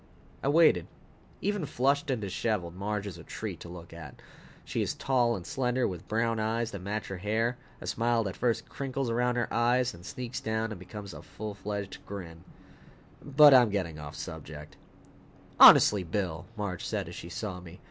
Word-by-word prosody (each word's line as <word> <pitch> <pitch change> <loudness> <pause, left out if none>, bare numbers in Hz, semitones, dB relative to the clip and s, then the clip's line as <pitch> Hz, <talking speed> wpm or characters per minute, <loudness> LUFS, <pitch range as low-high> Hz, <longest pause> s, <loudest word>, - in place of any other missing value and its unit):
I - - -2
waited. 145 - +5 0.5
Even 205 -6 -1
flushed 140 +4 +1
and 130 -3 0
disheveled, 95 -3 -2
Marge 100 +2 -3
is 100 - -7
a - - -10
treat - - -6
to 85 - -10
look 85 -1 -10
at. 80 -5 -10 0.5
She - - -2
is - - -1
tall 120 -3 +2
and 90 -4 -7
slender, 125 -1 0
with 90 -2 -7
brown 115 +1 0
eyes 115 +1 -1
that 100 - -6
match 100 +1 -3
her 95 - -4
hair, 115 +6 -1 0.2
a - - -9
smile 115 -1 +1
that 95 -3 -4
first 120 -2 0
crinkles 135 -2 -3
around 125 +1 +1
her 120 -1 0
eyes, 120 +1 +2
then 85 - -13
sneaks 125 +5 -5
down 110 0 -1
and 105 - -6
becomes 100 +1 -8
a - - -9
full 105 -1 -7
fledged 100 -1 -5
grin 85 -4 -8 0.8
But 145 +1 +7
I'm 125 -3 +7
getting 90 -6 -2
off 75 -1 -8
the - - -5
subject. - - -8 0.8
"Honestly, 105 -2 +9
Bill!" 85 -2 -3
Marge 100 -4 -3
said - - -2
as - - -8
she 85 - -8
saw 90 +1 -5
me. 90 0 -12
110 Hz, 190 wpm, -29 LUFS, 90-125 Hz, 0.8 s, Honestly